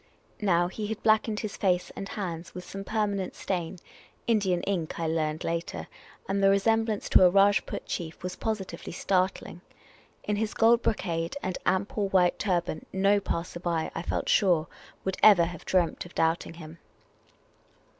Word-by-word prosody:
Now, 175 -4 +3
he 210 +3 -5
had 220 0 -5
blackened 215 -1 +2
his 215 -2 -5
face 180 -2 0
and 195 - -6
hands 175 -5 -5
with 180 - -6
some 195 +1 -7
permanent 200 -3 -1
stain 180 -1 -3 0.3
— - - -30
Indian 185 -4 0
ink, 175 -6 -2
I 165 - -1
learned 155 0 -1
later 170 0 -3 0.2
— - - -24
and 200 +1 0
the 195 - +5
resemblance 220 +2 +1
to - - +7
a 180 - +8
Rajput 200 +2 +2
chief 165 -2 -5
was 180 0 -4
positivelj' 195 -7 -4
startling. 185 -2 -1 0.6
In 210 0 -1
his 215 0 -2
gold 230 +1 +5
brocade 170 -2 -1
and 185 -1 -3
ample 200 +2 0
white 180 -2 +3
turban, 175 -5 -1
no 195 +2 +3
passer 175 -2 -4
by, 170 -2 -1
I - - -3
felt - - -2
sure, 175 -6 +3 0.4
would 190 0 -1
ever 200 -5 +8
have 170 -1 -8
dreamt 180 -3 +1
of - - -19
doubting 165 0 0
him. 160 0 -11
185 Hz, 165 wpm, -28 LUFS, 170-205 Hz, 0.6 s, a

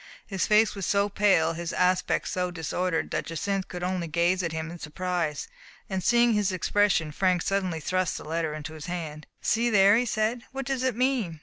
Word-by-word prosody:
His 195 -2 -2
face 215 +1 +4
was 195 -3 -4
so 200 0 +2
pale, 190 -5 +3
his 170 +1 -4
aspect 180 0 +1
so 180 -1 -1
disordered, 175 0 -2
that - - -2
Jacynth 190 +4 -2
could 180 0 -6
only 180 -2 -1
gaze 170 +4 +1
at 170 -2 -2
him 160 0 -4
in 175 - -9
surprise. 165 -1 -3 0.4
And 190 -1 -2
seeing 240 +3 +4
his 205 -2 +1
expression, 185 -3 +1
Frank 180 +2 +1
suddenly 190 -4 -1
thrust 185 +2 -1
the - - -8
letter 160 -1 -2
into 155 +1 -7
his 155 0 -8
hand. 160 -4 -5
"See 235 +2 +1
there,*' 200 -1 +6
he 245 +1 +1
said. 220 +3 0
"What 270 0 -5
does 270 -1 -1
it 260 -3 0
mean? 240 - 0
185 Hz, 200 wpm, -27 LUFS, 165-205 Hz, 0.4 s, there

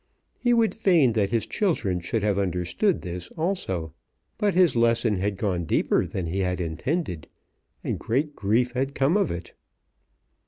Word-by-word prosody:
He 245 - +2
would 230 -2 +3
fain 170 - +3
that 105 -3 +1
his 115 0 0
children 120 - 0
should 100 +5 -2
have 100 -2 +1
understood 90 - 0
this 90 -1 -6
also. 95 - -2 0.5
But 205 -3 +1
his 180 -6 +4
lesson 115 -2 +2
had 100 +1 -1
gone 90 -4 -1
deeper - - +1
than 95 - -4
he 85 +4 -2
had 90 -1 0
intended, 90 - -3 0.6
and - - -2
great 145 +6 -1
grief 115 +5 +1
had 135 +2 -2
come 140 +6 +2
of 205 - +2
it. 85 0 -6
110 Hz, 160 wpm, -25 LUFS, -, 0.6 s, his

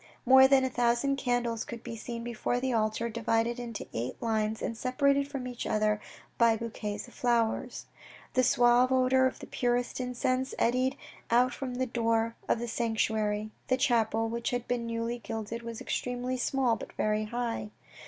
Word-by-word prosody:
More 265 +1 +8
than 270 -1 +5
a - - 0
thousand 245 +3 +1
candles 245 -3 0
could 235 -1 -8
be 235 -1 -6
seen 230 +1 -6
before 240 +1 -1
the 260 0 -1
altar, 220 +1 0
divided 230 +1 0
into 235 -3 -5
eight 120 +2 -4
lines 220 -2 0
and 230 - -2
separated 280 +3 +1
from 275 -3 -5
each 245 -1 -5
other 215 0 +1 0.4
by 230 -1 +5
bouquets 215 -2 -5
of 245 - -16
flowers. 235 -2 0 0.5
The 255 - +4
suave 245 +1 +4
odour 260 0 +4
of - - -5
the - - -9
purest 245 0 -1
incense 255 +1 -1
eddied 255 +3 +1 0.3
out 245 +2 +4
from 255 -2 -5
the 260 +1 0
door 230 -1 0
of - - +3
the 240 +1 -4
sanctuary. 220 -2 0 0.2
The 255 - +2
chapel, 225 -4 +2
which 235 +1 -2
had 245 -1 -3
been 240 -1 -1
newly 230 +1 -2
gilded, 225 0 -5
was 230 -1 -6
extremely 250 +1 -2
small 255 -1 +1
but - - -9
very 215 0 0
high. 230 -1 -3
235 Hz, 175 wpm, -30 LUFS, 225-255 Hz, 0.5 s, More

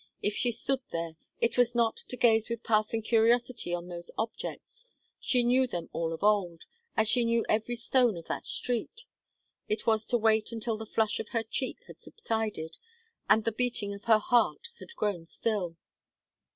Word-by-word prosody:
If 205 - +1
she 245 +2 +1
stood 260 +4 +1
there, 165 -1 -3 0.3
it 235 - +1
was 240 -1 +4
not 230 -2 +2
to 250 - -8
gaze 225 -2 +3
with 235 0 -4
passing 215 0 +1
curiosity 235 -2 +2
on 175 0 -3
those 175 -1 -6
objects; 230 - -5 0.3
she 250 -2 +2
knew 255 +2 +3
them 175 -8 -5
all 165 0 -1
of 165 +2 -6
old, 195 -6 +1 0.3
as 220 - +3
she 245 +2 +4
knew 230 0 +1
every 220 +3 0
stone 240 -3 +2
of 165 - -9
that - - -4
street; 250 - -1 0.6
it 215 0 -2
was 220 -1 +2
to 240 - +2
wait 220 0 +2
until 225 0 -2
the 220 0 -8
flush 220 -1 0
of - - -5
her 230 -1 -1
cheek 250 +4 -4
had - - -14
subsided, 220 - -4 0.5
and 220 - +5
the 230 - 0
beating 225 -3 -1
of 200 +3 -11
her 225 -2 +6
heart 245 - +1
had 470 - -11
grown 185 - -2
still. 185 -5 -2
225 Hz, 180 wpm, -29 LUFS, 205-240 Hz, 0.6 s, her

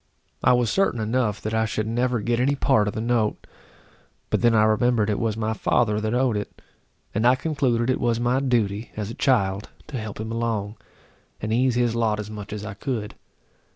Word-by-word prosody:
I - - +5
was 120 -3 +2
certain 195 -11 +1
enough 110 -1 0
that 110 - -3
I 110 0 +2
should 110 0 -2
never 120 +1 0
get 120 +2 0
any 140 +3 +2
part 130 -7 +2
of 105 - -3
the 110 - -2
note; 115 -2 0 0.9
but - - +1
then 120 -1 +4
I 110 - +5
remembered 110 0 +2
it 105 - -1
was 110 -2 -1
my 110 0 -1
father 105 0 +1
that 110 +2 -1
owed 125 -3 +2
it, 105 - -5 0.5
and 110 +3 +2
I 125 - +6
concluded 130 -5 0
it - - -1
was 120 -1 +1
my 120 +2 +2
duty 115 -5 0
as 105 0 -3
a - - -6
child 100 -8 +1 0.2
to 135 -5 -5
help 110 -2 -7
him 110 +1 -4
along, 115 -2 -2 0.6
and 110 +1 -2
ease 125 +1 +2
his 120 -2 +2
lot 110 -2 +1
as 105 0 -6
much 105 -1 -8
as 105 0 -5
I 105 - -5
could. 110 -1 -4
115 Hz, 210 wpm, -24 LUFS, 105-120 Hz, 0.9 s, I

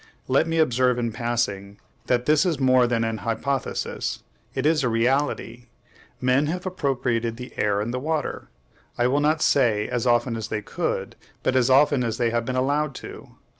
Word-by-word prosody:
Let 135 +5 +2
me 165 0 -1
observe 125 -5 +2
in 120 -1 -1
passing 105 -4 -2 0.3
that 125 -1 +1
this 155 0 +4
is 170 -6 0
more 130 -2 +4
than 115 -1 0
an 115 -1 -2
hypothesis; 125 +5 -3 0.3
it 130 - -1
is 155 -1 +3
a 125 - +2
reality. 120 0 0 0.5
Men 130 +3 +2
have 180 +4 -3
appropriated 120 -9 -1
the 125 +1 -9
air 100 -1 +1
and 110 +3 -3
the 125 - -2
water, 155 +1 -3 0.5
I 120 - +2
will 135 +3 +2
not 155 +2 +2
say 110 -6 +2
as 125 0 -2
often 120 0 +2
as 110 -2 -4
they 105 -1 -3
could, - - -3 0.3
but 130 - +1
as 130 -1 +3
often 135 0 +4
as 115 -1 -2
they 120 -1 +1
have 115 0 -1
been 130 - -3
allowed 140 +2 0
to. - - -10
125 Hz, 185 wpm, -24 LUFS, 115-140 Hz, 0.5 s, this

